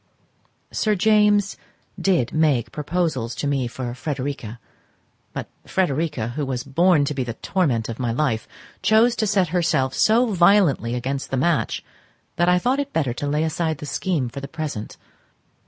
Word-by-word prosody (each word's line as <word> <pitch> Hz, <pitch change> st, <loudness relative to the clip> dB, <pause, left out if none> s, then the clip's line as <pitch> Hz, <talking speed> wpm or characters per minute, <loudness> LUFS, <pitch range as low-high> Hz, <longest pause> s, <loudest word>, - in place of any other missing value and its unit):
Sir 215 Hz, -1 st, +1 dB
James 210 Hz, 0 st, +3 dB, 0.4 s
did 180 Hz, -11 st, +1 dB
make 150 Hz, -7 st, +2 dB
proposals 150 Hz, -7 st, -2 dB
to 140 Hz, -, -3 dB
me 140 Hz, -3 st, 0 dB
for 120 Hz, 0 st, -5 dB
Frederica; 130 Hz, -4 st, -4 dB, 0.7 s
but -, -, -5 dB, 0.2 s
Frederica, 150 Hz, -8 st, 0 dB
who 145 Hz, +5 st, -3 dB
was 130 Hz, -2 st, -3 dB
born 155 Hz, +2 st, +3 dB
to 150 Hz, -, -2 dB
be 135 Hz, -2 st, -1 dB
the 115 Hz, -2 st, -5 dB
torment 135 Hz, -, 0 dB
of 115 Hz, +1 st, -6 dB
my 120 Hz, -2 st, 0 dB
life, 115 Hz, -3 st, -1 dB, 0.3 s
chose 220 Hz, +4 st, +4 dB
to 215 Hz, -, +1 dB
set 195 Hz, -4 st, +2 dB
herself 155 Hz, -7 st, +1 dB
so 225 Hz, +1 st, +3 dB
violently 175 Hz, -, +4 dB
against 135 Hz, +3 st, -3 dB
the 135 Hz, -, -1 dB
match 155 Hz, +3 st, 0 dB, 0.5 s
that 175 Hz, +1 st, +3 dB
I 180 Hz, -, +5 dB
thought 250 Hz, +9 st, +1 dB
it 285 Hz, 0 st, -3 dB
better 140 Hz, -7 st, 0 dB
to 145 Hz, +4 st, -4 dB
lay 150 Hz, +2 st, +1 dB
aside 160 Hz, 0 st, -1 dB
the 150 Hz, -, -8 dB
scheme 150 Hz, -3 st, -1 dB
for 120 Hz, +4 st, -7 dB
the 140 Hz, -, -7 dB
present. 150 Hz, -8 st, -5 dB
150 Hz, 165 wpm, -22 LUFS, 130-180 Hz, 0.7 s, I